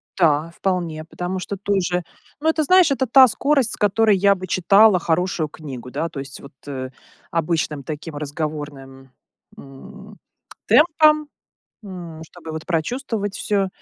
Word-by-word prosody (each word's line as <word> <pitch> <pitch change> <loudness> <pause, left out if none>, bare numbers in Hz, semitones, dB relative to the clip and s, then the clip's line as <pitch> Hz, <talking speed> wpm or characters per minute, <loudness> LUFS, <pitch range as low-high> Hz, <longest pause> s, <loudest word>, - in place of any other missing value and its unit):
Та, 160 -3 +2
вполне, 170 -3 -3
потому 180 +3 -5
что 200 +2 -5
тоже, 185 -3 -1 0.4
ну, 315 - +2
это, 320 -1 +1
знаешь, 365 0 +5
это 265 -1 +1
та 260 +2 +8
скорость, 275 0 +1
с - - -3
которой 210 0 +3
я 200 +1 +4
бы 185 -1 -7
читала 195 +3 +5
хорошую 170 -1 -1
книгу, 130 -5 -9
да. 165 - -2
То 145 - -8
есть 135 -1 -8
вот, 140 - -13
э, 130 -2 -5 0.4
обычным 160 -3 -1
таким 155 +2 -7
разговорным, 145 -3 -6 0.5
м, 200 +10 -13 0.5
темпом, 305 -1 +4 0.6
м, 175 -5 -9
чтобы 165 0 -11
вот 160 0 -6
прочувствовать 205 - -2
всё. 200 -2 0
180 Hz, 145 wpm, -21 LUFS, 155-210 Hz, 0.6 s, та